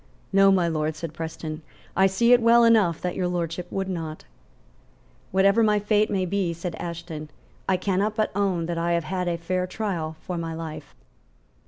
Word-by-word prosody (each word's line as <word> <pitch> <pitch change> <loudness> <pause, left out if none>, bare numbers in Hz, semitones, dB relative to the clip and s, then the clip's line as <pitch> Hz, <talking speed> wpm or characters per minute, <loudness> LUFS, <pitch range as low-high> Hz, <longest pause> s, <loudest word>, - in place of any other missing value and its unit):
"No, 195 0 +6
my 185 -3 +3
Lord;" 155 -1 -1
said 160 0 -6
Preston; 160 -1 -6 0.3
"I 190 - +5
see 235 +6 +4
it 245 - +5
well 235 +1 +6
enough 215 -8 +4
that 180 - -2
Your 180 - 0
Lordship 175 0 -3
would 195 -1 -2
not." 165 -4 -5 1.1
"Whatever 195 +4 +4
my 210 -1 +4
fate 210 +1 +2
may 190 -2 0
be," 185 -2 -1
said 170 +1 -5
Ashton, 170 -3 -6 0.4
"I 190 - +3
cannot 200 +3 0
but 215 -1 0
own 190 -4 0
that 170 0 -2
I 170 +1 +1
have 170 -1 +1
had 180 +2 -2
a 170 -1 0
fair 180 +2 -2
trial 180 -6 -3
for 175 +1 -5
my 165 -1 -4
life." 160 -1 -7
180 Hz, 185 wpm, -25 LUFS, 165-195 Hz, 1.1 s, No